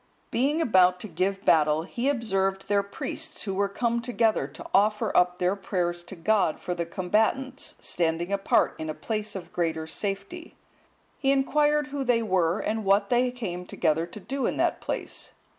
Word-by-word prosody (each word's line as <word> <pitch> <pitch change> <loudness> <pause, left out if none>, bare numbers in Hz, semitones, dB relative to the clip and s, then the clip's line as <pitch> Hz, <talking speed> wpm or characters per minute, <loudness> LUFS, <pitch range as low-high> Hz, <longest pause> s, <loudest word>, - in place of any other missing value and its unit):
Being 290 +6 +1
about 185 - +4
to - - -5
give 195 +3 -2
battle, 155 -1 +4
he 240 +9 -2
observed 195 -7 0
their 200 0 +3
priests, 305 +10 -5
who 195 - -3
were 200 +1 +1
come 235 +3 0
together 230 - +1
to 140 - -11
offer 210 +2 +2
up 180 0 +4
their 180 +2 +1
prayers 175 -3 -2
to 190 - -8
God 185 -2 +1
for 180 - -3
the 170 -1 -3
combatants, 220 +9 0
standing 170 +2 -1
apart 195 0 +2
in 160 0 -4
a 155 - -3
place 215 -2 -3
of 175 -2 -8
greater 160 -2 -1
safety; 200 - -4 0.6
he 270 - +2
inquired 295 +2 +2
who 280 -1 -3
they 240 -3 +2
were, 185 -4 +2
and 220 0 -2
what 200 +5 +2
they 250 +1 +3
came 195 -8 -5
together 165 -2 0
to 180 - -10
do 260 +8 -2
in - - -2
that - - +1
place. - - -5
200 Hz, 175 wpm, -27 LUFS, 180-235 Hz, 0.6 s, about